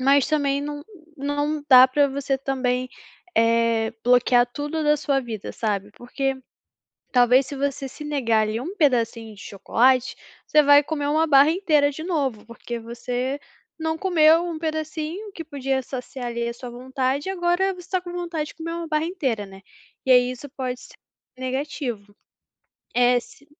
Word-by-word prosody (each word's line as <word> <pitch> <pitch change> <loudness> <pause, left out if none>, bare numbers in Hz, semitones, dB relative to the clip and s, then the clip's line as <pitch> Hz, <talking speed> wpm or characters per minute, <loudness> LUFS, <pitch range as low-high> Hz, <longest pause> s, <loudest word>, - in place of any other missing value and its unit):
mas 275 +1 +4
também 285 -2 +1
não 290 0 -6 0.3
não 290 +2 -2
dá 255 -1 +9
pra 280 +2 +2
você 270 0 -2
também, 255 -2 -1 0.5
eh, 230 -1 +2
bloquear 245 0 +4
tudo 295 +5 -4
da 300 0 +3
sua 280 -2 0
vida, 225 -5 -6
sabe, 205 -2 -2
porque, 270 +3 -3 0.8
talvez 250 +1 +5
se 280 - -7
você 275 0 -2
se 300 - -10
negar, 235 -7 +1
ali, 215 +2 -2
1 360 +10 -6
pedacinho 230 - +1
de 195 - -15
chocolate, 255 +5 +1 0.3
você 300 0 +5
vai 285 0 +7
comer 290 -2 -3
1 315 +2 +2
barra 285 0 +6
inteira 310 -5 +2
de 315 +3 -8
novo, 275 - -2
porque 235 0 -7
você 245 +4 -4 0.4
não 320 0 -1
comeu 330 -2 +4
1 335 -3 -4
pedacinho 315 +5 -4
que 330 - -7
podia 270 -3 -2
saciar 255 0 -7
ali 235 0 -3
a - - -3
sua 245 0 -9
vontade 260 +4 -2
e 385 - -1
agora 355 +2 +1
você 360 0 -13
tá 370 - +1
com 350 -1 -8
vontade 335 -4 -3
de - - -12
comer 330 0 -6
1 335 0 -4
barra 305 0 0
inteira, 265 - -2
né. 195 0 -14 0.4
E 260 - -1
aí, 250 0 +5
isso 255 +3 -8
pode 255 -2 -4
ser - - -15 0.4
negativo. 255 -6 -4 0.8
É 245 0 +4
se 290 +4 -18
275 Hz, 170 wpm, -23 LUFS, 245-305 Hz, 0.8 s, dá